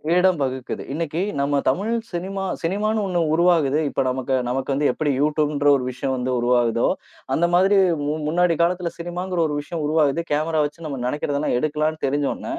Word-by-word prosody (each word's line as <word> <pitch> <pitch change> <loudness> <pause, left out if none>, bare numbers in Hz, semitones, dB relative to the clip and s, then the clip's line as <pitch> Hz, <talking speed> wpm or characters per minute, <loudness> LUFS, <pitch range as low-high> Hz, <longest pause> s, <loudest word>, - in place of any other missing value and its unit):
இடம் 180 -2 +3
வகுக்குது. 130 -1 -3
இன்னைக்கு 160 +1 -2 0.2
நம்ம 140 0 +1
தமிழ் 200 +12 +1 0.2
சினிமா 190 +3 -3 0.2
சினிமான்னு 210 +5 0
ஒண்ணு 180 -2 0
உருவாகுது. 160 -4 +3
இப்ப 135 - -1
நமக்கு 130 +1 -1
நமக்கு 130 +2 -2
வந்து 145 +2 +1
எப்டி 145 +3 -1
யுட்யூப்ன்ற 150 -1 +1
ஒரு 130 - -1
விஷயம் 130 +1 -3
வந்து 130 0 -2
உருவாகுதோ, 120 -1 +2 0.5
அந்த 170 - +2
மாதிரி 190 +3 +4 0.3
முன் 155 +1 -2
முன்னாடி 170 +2 +2
காலத்துல 175 0 +1
சினிமாங்கிற 175 +1 -4
ஒரு 150 - -3
விஷயம் 160 +1 -5
உருவாகுது. 155 0 +2
கேமராவச்சு 155 +1 0
நம்ம 140 -4 -4
நெனைக்கிறதலாம் 145 +1 -1
எடுக்கலாம்னு 155 +2 -1
தெரிஞ்சோன, 140 +1 -1
150 Hz, 155 wpm, -22 LUFS, 140-175 Hz, 0.5 s, மாதிரி